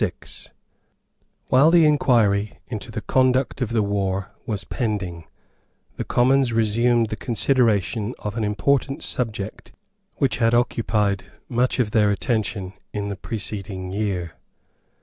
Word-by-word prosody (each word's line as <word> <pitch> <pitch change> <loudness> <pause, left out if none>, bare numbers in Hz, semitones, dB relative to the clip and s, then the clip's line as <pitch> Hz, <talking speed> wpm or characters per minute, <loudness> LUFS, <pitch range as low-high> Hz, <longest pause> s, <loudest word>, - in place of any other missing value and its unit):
While 135 +5 +6
the 165 -1 +6
inquiry 110 -9 +3
into - - -6
the - - -4
conduct 130 +1 +1
of 125 - 0
the 115 -2 +1
war 100 -1 -1 0.2
was 105 -3 -2
pending, 95 - -3 0.7
the - - -3
Commons 130 +1 +3
resumed 115 +1 +2
the 110 - -3
consideration 115 -2 +1
of 105 0 -5
an 115 - -1
important 135 +6 0
subject 110 -4 -3 0.4
which 135 -4 +1
had 115 0 +3
occupied 105 -4 +1 0.2
much 125 +1 +1
of 120 -5 +1
their 105 -2 +4
attention 100 -3 -1 0.2
in 100 -1 -3
the 100 - -3
preceding 100 -2 -4
year. 95 -4 -2
110 Hz, 125 wpm, -23 LUFS, 100-125 Hz, 0.7 s, While